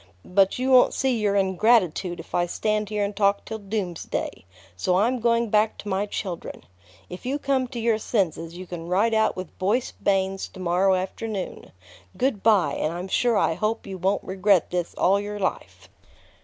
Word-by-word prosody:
But 195 +1 +2
you 260 +1 0
won't 255 -1 +6
see 265 -2 +1
your 205 -2 +1
ingratitude 190 -2 +2
if 165 - -11
I 175 0 +1
stand 210 +3 -1
here 210 -1 -1
and 200 0 -5
talk 200 0 +2
till 220 0 -5
doomsday; 195 - -4 0.3
so 180 - +1
I'm 240 +6 +2
going 230 -1 +1
back 215 +1 +2
to - - -10
my 195 +2 0
children. 185 -4 -5 0.4
If 180 - -9
you 265 +3 -1
come 275 -3 0
to 245 -1 -6
your 225 -1 +1
senses, 170 -6 -1
you 185 - -7
can 170 -2 -7
ride 205 +5 +2
out 220 0 +2
with 185 -3 -7
Boyce 210 +7 0
Bains 195 -1 0
to - - -11
morrow 185 +2 +2
afternoon. 190 +2 -5 0.5
Good 255 -6 0
by, 195 -10 +3
and 155 - -1
I'm 175 +3 -5
sure 240 +1 +2
I - - +2
hope 215 +6 -2
you 190 -1 -7
won't 190 +3 0
regret 190 -1 +2
this 175 -1 -2
all 195 +2 +3
your 205 +1 -5
life." 190 -2 -4
200 Hz, 185 wpm, -24 LUFS, 185-220 Hz, 0.5 s, won't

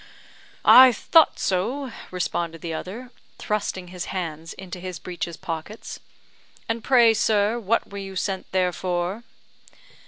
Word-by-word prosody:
"I 255 0 +10
thought 320 +6 +4
so," 240 +9 -1 0.2
responded 170 -2 -3
the 165 -1 -4
other, 225 +10 -7 0.3
thrusting 195 -4 -3
his 180 -1 -6
hands 165 -3 -5
into 185 -1 -9
his 185 -1 -6
breeches 170 0 -6
pockets. 165 +6 -6 0.7
"And 225 0 -2
pray, 240 -4 +5
sir, 215 +1 +2
what 230 0 0
were 200 - -6
you 195 -1 -7
sent 190 0 -3
there 185 -1 +1
for?" 180 +5 -2
190 Hz, 130 wpm, -24 LUFS, 175-225 Hz, 0.7 s, I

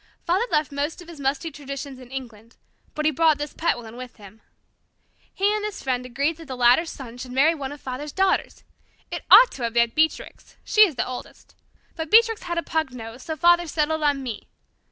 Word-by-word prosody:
Father 380 +8 +1
left 300 -2 +1
most 285 +4 -3
of - - -18
his 335 -3 -11
musty 280 +4 -2
traditions 275 -2 -7
in 250 -2 -13
England, 235 -4 -9 0.4
but 305 - -2
he 310 - +4
brought 315 +1 +3
this 295 0 -5
pet 335 -5 0
one 230 -1 -10
with 250 0 -9
him. 210 +1 -15 0.9
He 400 +2 +1
and 425 0 -2
this 420 -1 -5
friend 250 -2 -1
agreed 280 +6 -1
that 325 -2 -12
the 260 - -6
latter's 250 +7 +4
son 245 -3 -9
should 250 0 -7
marry 280 +6 +4
one 280 -4 -5
of 290 - -9
Father's 265 +3 -6
daughters. 385 +3 0 0.5
It - - -5
ought - - +9
to 265 - -9
have 230 -1 -2
been 235 -1 +3
Beatrix 315 +3 -2
she 425 -1 +6
is 315 - -8
the - - -1
oldest. 255 0 -9 0.4
But 320 -2 -5
Beatrix 450 +1 +5
had 345 -1 -4
a 335 - 0
pug 320 -5 -1
nose. 225 +1 -9
So 315 - -5
Father 345 +2 +4
settled 315 0 -1
on 285 -2 +1
me. 235 -5 -6
290 Hz, 215 wpm, -24 LUFS, 250-330 Hz, 0.9 s, ought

